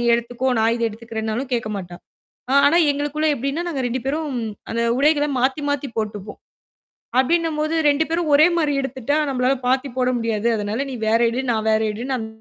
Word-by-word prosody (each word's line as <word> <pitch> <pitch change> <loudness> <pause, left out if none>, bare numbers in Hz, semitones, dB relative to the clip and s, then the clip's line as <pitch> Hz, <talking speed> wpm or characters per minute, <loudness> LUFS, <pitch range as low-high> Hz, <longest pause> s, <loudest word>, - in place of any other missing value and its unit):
நீ 240 - -1
எடுத்துக்கோ!" 245 +2 -2
நான் 225 +1 +3
இத 235 - -4
எடுத்துக்கறேன்னாலும் 225 +2 -4
கேக்க 225 -2 -2
மாட்டா. 175 -2 -7 0.5
அ - - +1
ஆனா, 320 +4 +4 0.2
எங்களுக்குள்ள 295 +2 -2
எப்பிடின்னா, 275 +6 -2
நாங்க 280 - -3
2 255 +2 -2
பேரும் 300 +2 -1 0.4
அந்த 235 +1 -1 0.2
உடைகள 295 +1 +3
மாத்தி 265 +3 +1
மாத்தி 285 -1 -2
போட்டுப்போம். 210 -1 -5 0.8
அப்பிடின்னம்போது, 315 +2 +1 0.2
2 295 +3 +2
பேரும் 330 -2 0
ஒரே 305 +3 +7
மாரி 300 -3 +1
எடுத்துட்டா, 265 +2 -2
நம்பளால 260 +1 +1
மாத்திப் 260 0 0
போட 250 - +2
முடியாது. 230 0 -1
அதனால 210 +6 -2
நீ - - -5
வேற 225 +1 +4
எடு. 250 +3 -2
நான் 220 -1 -1
வேற 220 - +3
எடு 220 - -7
நான் 230 -4 -2
260 Hz, 180 wpm, -21 LUFS, 225-290 Hz, 0.8 s, ஒரே